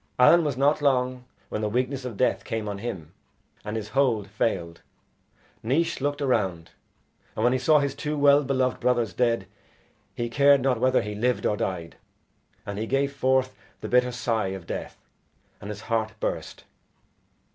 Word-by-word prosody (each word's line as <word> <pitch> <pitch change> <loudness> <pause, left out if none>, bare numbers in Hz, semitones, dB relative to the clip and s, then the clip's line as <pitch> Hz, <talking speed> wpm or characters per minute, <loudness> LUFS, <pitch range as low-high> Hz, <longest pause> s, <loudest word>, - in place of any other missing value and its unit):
Allen 170 +7 +6
was 145 -4 -2
not 145 +3 +2
long 130 -2 +1 0.2
when 105 - -3
the 105 - 0
weakness 130 +3 -1
of 120 -5 -6
death 125 - +1
came 110 -1 -4
on 100 -1 -4
him, 95 -9 -6 0.5
and 105 +1 -5
his 110 -1 -5
hold 120 -6 +1
failed. 95 -5 -2 0.8
Naois 160 +7 0
looked 145 +1 -1
around, 95 -11 -1 0.6
and - - -2
when 125 - +4
he 130 - +1
saw 155 +2 +4
his 140 -1 0
two 150 +2 -3
well 145 0 +5
beloved 130 -2 0
brothers 120 -3 +1
dead, 120 -2 +1 0.7
he 120 - -2
cared 140 +2 +4
not 125 -2 +1
whether 130 +1 +3
he 105 +1 -5
lived 120 +4 0
or 105 - +2
died, 90 -6 -4 0.7
and 100 0 -5
he 110 - -3
gave 140 +2 0
forth 130 -1 +1 0.3
the - - -4
bitter 125 0 +3
sigh 115 -4 -1
of 95 -2 -6
death, - - -6 0.6
and 105 - -7
his 105 -1 -6
heart 110 -1 -1
burst. - - -4
125 Hz, 170 wpm, -25 LUFS, 105-135 Hz, 0.8 s, Allen